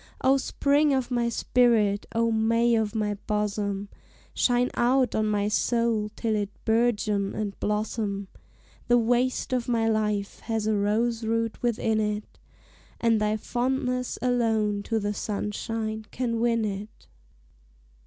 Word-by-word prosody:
O 270 +1 +4
Spring 285 +1 +2
of 260 -1 -2
my 240 -1 +1
spirit, 225 -4 +2
O 230 0 +2
May 230 +2 +2
of 220 -1 0
my 210 -1 0
bosom, 205 -1 -1 0.5
Shine 245 0 +2
out 255 +1 +2
on 215 0 +1
my 205 -1 +1
soul, 225 0 +1
till 225 -2 -1
it 205 -1 -1 0.2
bourgeon 215 -3 +1
and 205 -2 -2
blossom; 210 -1 -2 0.6
The 240 - +5
waste 245 +2 +1
of 250 -2 0
my 230 -2 +2
life 210 -2 -1
has 225 -2 -2
a 215 0 +2
rose 225 +3 0
root 230 0 -1
within 225 -2 +1
it, 210 0 -3 0.6
And 225 -2 +2
thy 210 0 +1
fondness 250 +2 -1
alone 225 -4 +1
to 225 - 0
the 205 0 -2
sunshine 215 +1 -3
can 230 -2 -2
win 230 -1 +2
it. 205 +1 -6
225 Hz, 135 wpm, -26 LUFS, 210-240 Hz, 0.6 s, The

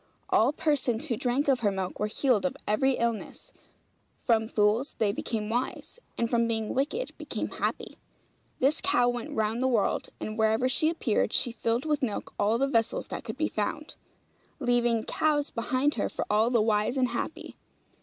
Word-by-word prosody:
All 230 +5 +4
persons 285 -6 0
who 250 -7 -1
drank 250 +6 0
of 265 -3 +3
her 205 -3 +1
milk 190 -1 -4
were 210 - +1
healed 235 0 +1
of 275 0 -1
every 265 +6 +2
illness; 235 -3 -3 0.7
from 225 -2 +3
fools 215 +5 +1
they 210 -2 +2
became 215 +1 -3
wise; 245 - -3 0.2
and 235 - +1
from 235 0 +2
being 220 -2 -1
wicked, 305 - -2
became - - -4
happy. - - -3 0.6
This 275 +4 +2
cow 245 -10 +3
went 245 -1 -4
round 220 +2 0
the 260 - +2
world; 230 -6 +1
and 215 +1 -5
wherever 220 +3 +3
she 285 +5 +2
appeared, 255 -10 0
she 240 - +3
filled 230 +2 -1
with 300 -2 0
milk 230 -6 -3
all 210 +3 +3
the 275 +3 +1
vessels 230 -5 0
that - - -5
could 230 +1 -6
be 310 +1 +1
found, 215 +8 -3 0.7
leaving 240 -3 +2
calves 295 +1 +1
behind 255 +5 0
her 210 - -1
for - - -4
all 215 +2 +3
the 235 -3 +3
wise 215 +3 +1
and 255 -1 +2
happy. - - -5
235 Hz, 180 wpm, -28 LUFS, 220-265 Hz, 0.7 s, All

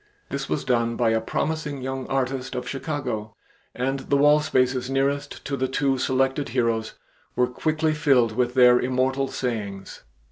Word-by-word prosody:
This 140 0 -4
was - - -1
done 115 -2 +1
by 115 -2 +2
a 110 0 +1
promising 150 +2 -3
young 130 0 -4
artist 135 0 -2
of 125 0 -4
Chicago, 130 -7 -4 0.4
and 135 +2 -1
the 140 +1 0
wall 145 +1 +5
spaces 130 -3 +1
nearest 140 +1 -1
to 140 - -2
the 130 -1 -1
two 135 0 0
selected 135 +2 0
heroes 115 -2 0 0.4
were 125 - +3
quickly 155 +5 0
filled 135 -7 +3
with 125 0 0
their 125 -1 +7
immortal 130 +2 0
sayings. 105 -7 -4
130 Hz, 155 wpm, -24 LUFS, 125-140 Hz, 0.4 s, their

